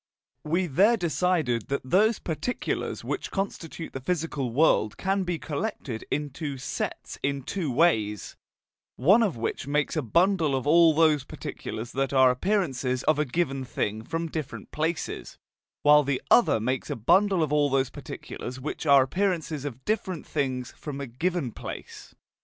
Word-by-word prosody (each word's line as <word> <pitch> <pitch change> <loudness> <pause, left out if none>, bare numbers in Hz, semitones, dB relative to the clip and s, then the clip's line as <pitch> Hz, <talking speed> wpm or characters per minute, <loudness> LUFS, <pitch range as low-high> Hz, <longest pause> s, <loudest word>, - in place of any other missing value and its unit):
We 170 +5 +1
there 195 - +4
decided 160 - 0
that 140 - -2
those 205 - +3
particulars 175 +10 -3
which - - -3
constitute 170 -4 -4
the 135 - -4
physical 155 -4 -2
world 120 -5 +3
can 195 +1 0
be 175 -2 -2
collected 145 - -4
into 145 0 -3
sets 130 - -5
in 140 -1 -1
two 165 -1 -2
ways, 110 - +1 0.6
one 190 - +5
of 200 - +1
which 115 +3 -3
makes 150 +2 0
a 155 - +1
bundle 165 - +2
of 130 - -2
all 165 +1 +6
those 155 -3 +4
particulars 115 +3 -6
that 135 0 -1
are 130 -1 +6
appearances 130 -6 0
of 155 -1 +2
a 150 - +2
given 135 -1 -1
thing 110 -3 -3
from 165 +7 -3
different 155 -3 -6
places, 160 +2 -3 0.5
while 150 0 +7
the 140 -2 0
other 240 - +5
makes 130 +4 -2
a - - -2
bundle 185 - +3
of 150 -1 -1
all 145 -1 +3
those 135 -1 +1
particulars 125 +1 -7
which 150 +3 -5
are 140 -2 +7
appearances 160 -2 -1
of 130 -2 -7
different 190 -6 -2
things 130 -4 -2
from 145 -2 -7
a 140 - -3
given 140 +2 -2
place. - - -9
150 Hz, 160 wpm, -27 LUFS, 130-175 Hz, 0.6 s, while